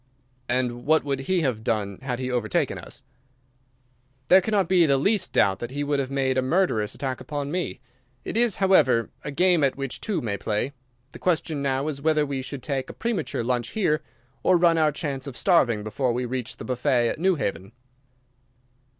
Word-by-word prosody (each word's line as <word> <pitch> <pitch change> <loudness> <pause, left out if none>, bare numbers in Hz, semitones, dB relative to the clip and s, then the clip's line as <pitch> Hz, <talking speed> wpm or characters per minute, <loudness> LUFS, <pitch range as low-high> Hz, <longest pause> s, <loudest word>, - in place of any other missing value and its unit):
"And 120 -1 -1
what 160 +1 +4
would 140 -1 -2
he 175 +6 0
have 125 -7 -1
done 100 -4 -1
had 130 -2 -3
he 130 0 -3
overtaken 120 -4 0
us?" - - -10 1.3
"There 190 +1 +8
cannot 200 -2 +1
be 175 -2 +4
the 140 -1 +3
least 195 +6 +1
doubt 95 0 +2
that 120 - -5
he 145 +2 -3
would 145 0 0
have 135 -2 -2
made 135 -1 +1
a - - +2
murderous 130 - +1
attack 130 -2 -4
upon 145 -1 -4
me. 180 +1 -3 0.4
It - - -4
is, 235 -3 +3
however, 130 - +3
a - - -4
game 175 +2 +3
at 135 - +2
which 135 -2 -5
two 210 -4 -1
may 100 -4 -2
play. 110 +7 -2 0.4
The - - -11
question 160 -4 0
now 135 +1 0
is 140 -3 -4
whether 155 0 +2
we 140 -2 -3
should 130 0 -7
take 135 -3 -3
a - - -7
premature 230 - -2
lunch 120 0 -1
here, 155 -7 +2 0.4
or 185 - +4
run 170 -1 +4
our 155 -1 +3
chance 140 -3 -4
of 135 - -7
starving 120 - +3
before 120 +4 -1
we 125 +1 -2
reach 125 -1 -4
the - - -8
buffet 125 -1 +1
at - - -4
Newhaven." 135 - -1
140 Hz, 195 wpm, -25 LUFS, 125-165 Hz, 1.3 s, There